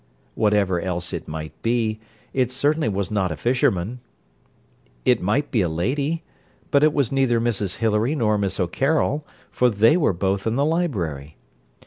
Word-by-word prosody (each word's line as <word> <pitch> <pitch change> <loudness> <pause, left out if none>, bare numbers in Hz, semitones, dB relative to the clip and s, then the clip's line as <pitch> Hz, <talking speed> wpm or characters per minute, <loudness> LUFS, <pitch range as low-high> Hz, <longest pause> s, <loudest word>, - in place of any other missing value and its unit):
Whatever 105 -5 +1
else 90 -1 -2
it - - -5
might 80 0 -6
be, 115 -2 0 0.3
it 130 -2 +1
certainly 145 +1 +1
was 100 -2 -2
not 95 -4 0
a - - -3
fisherman. 120 - 0 1.1
It - - +3
might 120 +11 0
be 115 - +2
a 90 - +1
lady; 140 - -1 0.5
but 140 0 +4
it 155 - +5
was 140 -6 0
neither 135 -4 +2
Mrs 105 -5 -1
Hilary 115 +5 +1
nor 110 -6 +1
Miss 95 -1 -1
O'Carroll, 140 - 0 0.2
for 125 - +3
they 115 +6 +4
were 175 - +3
both 95 +3 -1
in 110 - 0
the 140 +2 +2
library. 90 - -2
110 Hz, 160 wpm, -23 LUFS, 95-135 Hz, 1.1 s, it